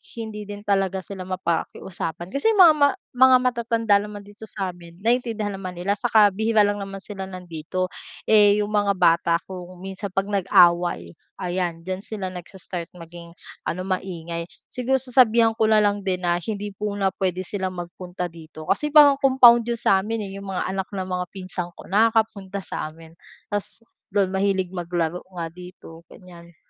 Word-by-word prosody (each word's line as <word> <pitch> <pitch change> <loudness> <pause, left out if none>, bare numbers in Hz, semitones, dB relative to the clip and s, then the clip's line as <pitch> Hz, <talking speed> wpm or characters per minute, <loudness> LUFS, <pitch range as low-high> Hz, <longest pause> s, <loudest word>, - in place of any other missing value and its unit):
hindi 220 -2 -6
din 205 0 -8
talaga 195 -2 0
sila 185 0 -8
mapakiusapan 175 -1 -3
kasi 280 - +1
mga, 365 -6 +8
ma 285 -1 +5 0.3
mga 260 0 +7
matatanda 230 -4 +2
naman 205 0 -6
dito 205 +2 -12
sa 195 -3 -4
amin 170 0 -13
naintindihan 225 -3 0
naman 185 -1 -6
nila 185 +4 -1
saka 220 -3 +5
bihira 220 +2 +2
lang 205 0 +2
naman 195 -1 -7
sila 195 -1 -7
nandito. 180 -1 -5 0.4
Eh, 210 -1 +6
'yong 205 - -2
mga 205 -1 +2
bata 170 -1 +3 0.2
kung 180 -2 -7 0.2
minsan 195 +1 -6
'pag 195 +1 0
nag-away, 175 - +3 0.3
ayan 175 -2 -2
diyan 185 +2 -4
sila 200 -4 -4
nagsa-start 180 -1 -8
maging 170 0 -11 0.3
ano, 180 - -2
maingay. 170 -3 -3 0.2
Siguro 260 +2 0
sasabihan 235 -3 +4
ko 220 - +3
na 215 -1 +5
lang 205 -1 0
din 185 -1 -1
na 175 -1 +1
hindi 205 0 -4
muna 205 -2 -1
puwede 185 -1 -1
sila 190 0 -3
magpunta 180 0 -6
dito 160 -1 -12
kasi 300 -1 0
parang 290 -2 +8
compound 245 -4 +6
'yon 235 -1 -2
sa 195 - +4
amin 225 +2 -3
eh, 195 - -8
'yong 200 - -9
mga 180 - -1
anak 190 0 -3
ng 190 -2 -3
mga 180 -1 -2
pinsan 185 -2 -5
ko, - - -13
nakakapunta 210 -2 +1
sa 155 - -5
amin 165 0 -15 0.3
tas 205 +1 -4 0.3
do'n 200 -2 +2
mahilig 190 -1 +1
maglaro 175 -1 -2
nga 170 -2 -4
dito 180 -2 -12
ganyan. 170 -2 -15
195 Hz, 170 wpm, -23 LUFS, 180-210 Hz, 0.4 s, mga